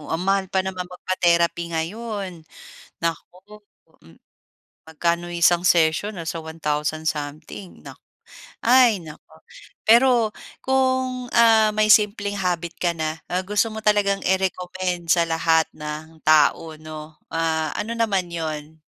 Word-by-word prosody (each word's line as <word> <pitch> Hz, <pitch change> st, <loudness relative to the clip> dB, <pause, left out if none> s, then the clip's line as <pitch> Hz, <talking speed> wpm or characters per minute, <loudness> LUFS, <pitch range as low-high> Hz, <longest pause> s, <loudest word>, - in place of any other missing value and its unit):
oh, 150 Hz, -, -12 dB
ang 165 Hz, -, -1 dB
mahal 195 Hz, 0 st, +1 dB
pa 190 Hz, 0 st, 0 dB
naman 185 Hz, -1 st, -5 dB
magpa-therapy 170 Hz, -2 st, 0 dB
ngayon. 190 Hz, -1 st, -5 dB, 0.6 s
Naku, 185 Hz, +5 st, -5 dB, 0.4 s
Hmm, 80 Hz, 0 st, -18 dB, 0.7 s
magkano 170 Hz, +2 st, -1 dB
isang 175 Hz, 0 st, +3 dB
session, 170 Hz, +5 st, +2 dB
nasa 165 Hz, 0 st, -4 dB
1000 155 Hz, 0 st, -3 dB
something 150 Hz, +5 st, -6 dB
nak -, -, -11 dB, 0.7 s
ay 240 Hz, -4 st, +5 dB
naku. 155 Hz, 0 st, -14 dB, 0.5 s
Pero 235 Hz, -1 st, +5 dB, 0.3 s
kung, 260 Hz, -1 st, 0 dB
ah, 225 Hz, -2 st, +5 dB
may 215 Hz, 0 st, +3 dB
simpleng 205 Hz, -1 st, +2 dB
habit 175 Hz, -2 st, -1 dB
ka 175 Hz, -1 st, +1 dB
na, 155 Hz, 0 st, -3 dB
ah, 180 Hz, +1 st, -1 dB
gusto 210 Hz, +3 st, +1 dB
mo 220 Hz, -, -6 dB
talagang 205 Hz, -2 st, +2 dB
i-recommend 180 Hz, -2 st, -2 dB
sa 170 Hz, -1 st, +3 dB
lahat 160 Hz, 0 st, +2 dB
ng 155 Hz, +1 st, -8 dB
tao 155 Hz, +1 st, +3 dB
'no, 155 Hz, 0 st, -10 dB, 0.2 s
ah, 160 Hz, -2 st, 0 dB
ano 225 Hz, +2 st, -3 dB
naman 195 Hz, -6 st, 0 dB
'yon? 155 Hz, -1 st, -6 dB
175 Hz, 125 wpm, -22 LUFS, 160-205 Hz, 0.7 s, ay